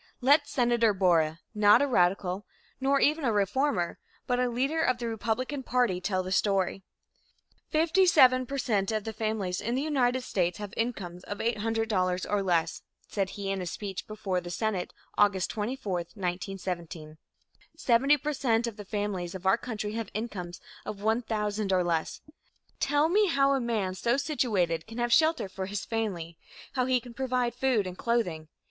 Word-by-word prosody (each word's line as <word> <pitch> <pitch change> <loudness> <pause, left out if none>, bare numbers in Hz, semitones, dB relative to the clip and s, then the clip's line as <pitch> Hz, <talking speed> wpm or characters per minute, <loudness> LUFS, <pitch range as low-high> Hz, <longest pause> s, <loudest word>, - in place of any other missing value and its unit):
Let 285 +3 +4
Senator 235 -5 +2
Borah, 165 -4 +2
not 210 +1 +6
a 285 - +3
radical 185 -3 +1 0.4
nor 275 +1 +2
even 305 +2 +2
a 240 - +2
reformer, 205 -1 0 0.3
but 245 -1 0
a 250 0 +2
leader 270 +7 0
of 255 -6 +2
the 240 -1 -4
Republican 230 +5 -2
party, 245 -8 +1
tell 185 -1 0
the 185 - -6
story. 195 -1 +1 0.9
"Fifty 335 +4 +3
seven 255 -6 +6
per 275 - -4
cent 210 -6 0
of 215 -1 -1
the 220 - -5
families 215 -5 -2
in 235 +3 -1
the 265 - 0
United 260 -4 +1
States 180 -7 -1
have 205 0 -7
incomes 190 -7 -3
of 205 - -5
$800 215 -5 0
or 205 -1 +1
less," 170 -4 0 0.3
said 195 -2 -1
he 195 -1 -2
in 195 -1 -2
a 180 - -4
speech 195 +1 -5
before 195 -4 -2
the 175 - -8
Senate, 190 0 -2 0.3
August 200 -3 +3
24, 215 -1 -3 0.2
1917, 175 -4 -5 0.6
"Seventy 275 0 +4
per 300 +2 -3
cent 240 -4 +1
of 230 -2 -5
the 205 - -8
families 195 -4 -3
of 190 0 -8
our 190 - +5
country 215 -4 -4
have 225 -2 -4
incomes 185 -6 -5 0.2
of 210 - -5
$1,000 215 -2 -1
or 185 -1 +3
less. 165 -2 -1 0.6
Tell 290 +2 +2
me 410 +5 +3
how 275 -4 +3
a 270 - +1
man 215 -6 -1
so 235 +7 0
situated 200 - 0
can 225 +1 -9
have 240 -1 +1
shelter 320 -7 +3
for 190 0 -5
his 200 -1 -4
family; 180 -8 -3 0.3
how 255 -2 0
he 255 -1 +3
can 240 0 -12
provide 250 -1 -1
food 245 -4 +1
and 180 -1 -5
clothing. 185 -8 -1
215 Hz, 175 wpm, -28 LUFS, 185-250 Hz, 0.9 s, not